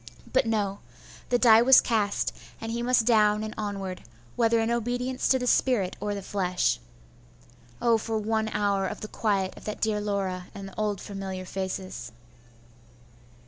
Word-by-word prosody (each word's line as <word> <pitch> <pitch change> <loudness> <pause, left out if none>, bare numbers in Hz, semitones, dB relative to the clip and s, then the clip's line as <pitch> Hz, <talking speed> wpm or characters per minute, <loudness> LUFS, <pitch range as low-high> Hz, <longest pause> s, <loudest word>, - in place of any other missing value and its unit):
But - - +3
no! 205 -3 0 0.5
the 245 - +3
die 230 -2 +7
was 260 +2 +8
cast, 210 -4 0 0.2
and 225 0 -5
he 235 +1 -2
must 240 -1 +3
down 215 -2 +4
and 215 - -5
onward, 195 -3 -4 0.3
whether 230 0 +3
in 225 +1 0
obedience 245 +2 -1
to 260 - +5
the 250 - -3
spirit 240 -7 +2
or 205 0 -2
the 200 - -6
flesh. 180 - 0 1.0
Oh, 230 -2 +3
for 220 0 -2
one 220 +1 0
hour 200 -2 0
of - - -6
the 215 - -5
quiet 200 -4 -1
of - - -13
that 210 - -4
dear 215 -1 0
Laura 190 -3 -2
and 195 -1 -7
the 195 - -12
old 210 -3 -1
familiar 190 -2 -6
faces! 190 -7 -5
210 Hz, 165 wpm, -27 LUFS, 195-230 Hz, 1.0 s, was